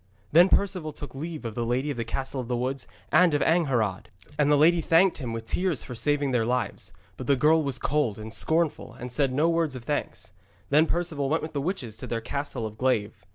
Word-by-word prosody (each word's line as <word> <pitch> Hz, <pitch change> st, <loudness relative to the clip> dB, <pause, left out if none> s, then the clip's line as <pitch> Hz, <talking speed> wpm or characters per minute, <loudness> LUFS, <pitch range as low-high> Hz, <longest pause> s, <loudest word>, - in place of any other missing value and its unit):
Then 175 Hz, +4 st, +6 dB
Perceval 180 Hz, -6 st, 0 dB
took 145 Hz, -, -8 dB
leave 155 Hz, 0 st, -6 dB
of 115 Hz, -, -4 dB
the 120 Hz, -, -2 dB
lady 125 Hz, +5 st, -1 dB
of 135 Hz, -, -5 dB
the 115 Hz, -, -1 dB
Castle 130 Hz, +3 st, -3 dB
of 120 Hz, -, -9 dB
Weeds, 125 Hz, +2 st, -2 dB, 0.2 s
and 175 Hz, -4 st, +5 dB
of 145 Hz, -, +2 dB
Angharad. 125 Hz, -, +1 dB, 0.3 s
And 145 Hz, -1 st, +2 dB
the 150 Hz, -, +5 dB
lady 165 Hz, +3 st, +5 dB
thanked 170 Hz, +3 st, +3 dB
him 125 Hz, -5 st, -4 dB
with 115 Hz, 0 st, -5 dB
tears 180 Hz, -1 st, 0 dB
for 125 Hz, -, -8 dB
saving 145 Hz, +3 st, +1 dB
their 120 Hz, -3 st, +2 dB
lives, 120 Hz, -5 st, -2 dB, 0.3 s
but 130 Hz, -, -7 dB
the 140 Hz, -, +4 dB
girl 155 Hz, +5 st, +4 dB
was 140 Hz, -3 st, 0 dB
cold 140 Hz, -8 st, 0 dB
and 110 Hz, +1 st, -7 dB
scornful 160 Hz, +7 st, +1 dB
and 125 Hz, +1 st, -8 dB
said 135 Hz, +1 st, +1 dB
no 150 Hz, +5 st, +2 dB
word 165 Hz, -4 st, 0 dB
of 125 Hz, -, -8 dB
thanks. 145 Hz, -7 st, -3 dB, 0.4 s
Then 155 Hz, +3 st, +5 dB
Perceval 160 Hz, -5 st, -1 dB
went 160 Hz, +2 st, 0 dB
with 155 Hz, 0 st, -6 dB
the 140 Hz, -, -1 dB
witches 135 Hz, -, -3 dB
to -, -, -6 dB
their 115 Hz, -, -2 dB
Castle 140 Hz, 0 st, -4 dB
of 110 Hz, 0 st, -8 dB
Glaive. 120 Hz, -6 st, +1 dB
140 Hz, 225 wpm, -26 LUFS, 120-160 Hz, 0.4 s, Then